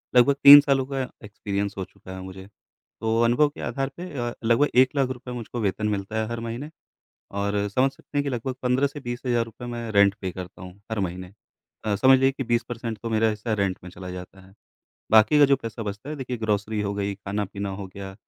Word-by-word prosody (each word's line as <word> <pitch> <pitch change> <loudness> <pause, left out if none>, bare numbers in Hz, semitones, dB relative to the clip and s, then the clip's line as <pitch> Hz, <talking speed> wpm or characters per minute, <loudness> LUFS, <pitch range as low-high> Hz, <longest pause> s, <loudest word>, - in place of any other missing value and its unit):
लगभग 135 +3 +6
3 145 +1 +12
सालों 135 -2 +1
का 135 -1 -3 0.2
एक्सपीरियंस 100 -1 -3
हो 95 - -2
चुका 95 - -14
है 95 - -7
मुझे। 95 +1 -9 0.5
तो 110 0 +1
अनुभव 125 +6 +4
के - - -11
आधार 135 0 -2
पे 180 +1 -6
अ, 120 -1 -2
लगभग 120 +6 +3
1 130 +3 +5
लाख 135 -2 +2 0.2
मुझको 120 0 -5
वेतन 105 +1 0
मिलता 105 +2 -3
है - - -1
हर 115 0 -3
महीने, 115 +6 -5 0.6
और 100 0 -1
समझ 130 +6 +2
सकते 145 - -12
हैं - - +3
कि - - -2
लगभग 125 +1 -3
15 125 +3 +2
से 145 +1 -7
20 120 -1 -5
हज़ार 120 -1 +2
रुपए 115 +2 -11
मैं 120 -2 -5
रेंट 100 0 +5
पे 95 -2 -3
करता 90 0 -9
हूँ 90 +2 -11
हर 110 - -2
महीने। 90 0 -4 0.5
अ, 105 -1 +1
समझ 130 +4 +6
लीजिए 135 0 +4
कि 135 -1 -4
20 120 0 +1
परसेंट 115 -2 -5
तो 115 - -3
मेरा 110 0 +3
हिस्सा 110 +2 -3
रेंट 100 -2 0
में 90 - -8
चला 90 0 -8
जाता 90 +1 -9
है। 95 - -20 0.6
बाकी 110 +7 +6
का 145 - +8
जो 140 0 +4
पैसा 115 -2 -6
बचता 105 +7 -6
है 155 - -4
देखिए 125 -2 -4
ग्रोसरी 105 0 -1
हो 100 -1 -1
गई, 100 0 -2
ख़ाना-पीना 100 0 -4
हो 95 0 -6
गया, 95 -1 -7
110 Hz, 225 wpm, -25 LUFS, 100-130 Hz, 0.6 s, 3